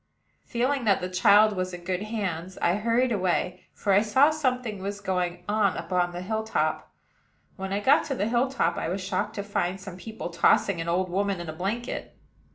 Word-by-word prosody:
Feeling 255 Hz, +1 st, 0 dB
that 200 Hz, -3 st, +4 dB
the 180 Hz, -, -4 dB
child 205 Hz, +3 st, +5 dB
was 185 Hz, -1 st, -2 dB
in 175 Hz, -, -11 dB
good 180 Hz, +1 st, -2 dB
hands, 190 Hz, -5 st, -4 dB
I 170 Hz, -, +2 dB
hurried 235 Hz, +4 st, +1 dB
away, 180 Hz, -2 st, -1 dB
for 200 Hz, -, 0 dB
I 200 Hz, -, +6 dB
saw 260 Hz, +8 st, +4 dB
something 250 Hz, -9 st, -1 dB
was 200 Hz, +1 st, -4 dB
going 180 Hz, -2 st, -2 dB
on 205 Hz, -2 st, +2 dB
upon 180 Hz, -1 st, 0 dB
the 175 Hz, +1 st, -6 dB
hill 220 Hz, +3 st, -2 dB
top. 220 Hz, -, -1 dB, 0.6 s
When 190 Hz, -1 st, -5 dB
I 200 Hz, +1 st, 0 dB
got 275 Hz, +7 st, +4 dB
to 275 Hz, -, -2 dB
the 210 Hz, -, -1 dB
hill 240 Hz, +3 st, +2 dB
top, 200 Hz, -10 st, 0 dB
I -, -, -2 dB
was 185 Hz, +3 st, -2 dB
shocked 195 Hz, +3 st, -2 dB
to 200 Hz, -, -3 dB
find 190 Hz, -2 st, -2 dB
some 190 Hz, -2 st, -9 dB
people 220 Hz, -2 st, -7 dB
tossing 175 Hz, +2 st, +3 dB
an 165 Hz, -, -3 dB
old 180 Hz, +1 st, 0 dB
woman 200 Hz, 0 st, 0 dB
in 170 Hz, -2 st, -6 dB
a -, -, -4 dB
blanket. 210 Hz, +9 st, -4 dB
200 Hz, 205 wpm, -26 LUFS, 180-220 Hz, 0.6 s, I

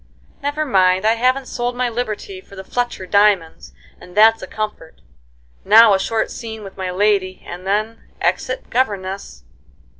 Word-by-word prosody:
Never 290 Hz, +2 st, -2 dB
mind, 190 Hz, -5 st, +3 dB
I 220 Hz, -, +5 dB
haven't 255 Hz, +3 st, +1 dB
sold 245 Hz, 0 st, -3 dB
my 250 Hz, 0 st, 0 dB
liberty 215 Hz, -5 st, -4 dB
for 195 Hz, -, -16 dB
the 190 Hz, -, -8 dB
Fletcher 240 Hz, -2 st, -3 dB
diamonds, 200 Hz, -4 st, +2 dB, 0.3 s
and 180 Hz, +2 st, -14 dB
that's 225 Hz, +1 st, +6 dB
a -, -, -7 dB
comfort. 210 Hz, -7 st, -6 dB, 0.6 s
Now 220 Hz, +1 st, +7 dB
a 190 Hz, -, +2 dB
short 220 Hz, +3 st, -1 dB
scene 220 Hz, -2 st, -7 dB
with 195 Hz, -1 st, -10 dB
my 190 Hz, -1 st, -4 dB
lady 190 Hz, 0 st, 0 dB
and 180 Hz, +2 st, -8 dB
then 215 Hz, +3 st, -1 dB, 0.2 s
exit -, -, -2 dB
governess." 195 Hz, -, -2 dB
210 Hz, 155 wpm, -19 LUFS, 190-230 Hz, 0.6 s, Now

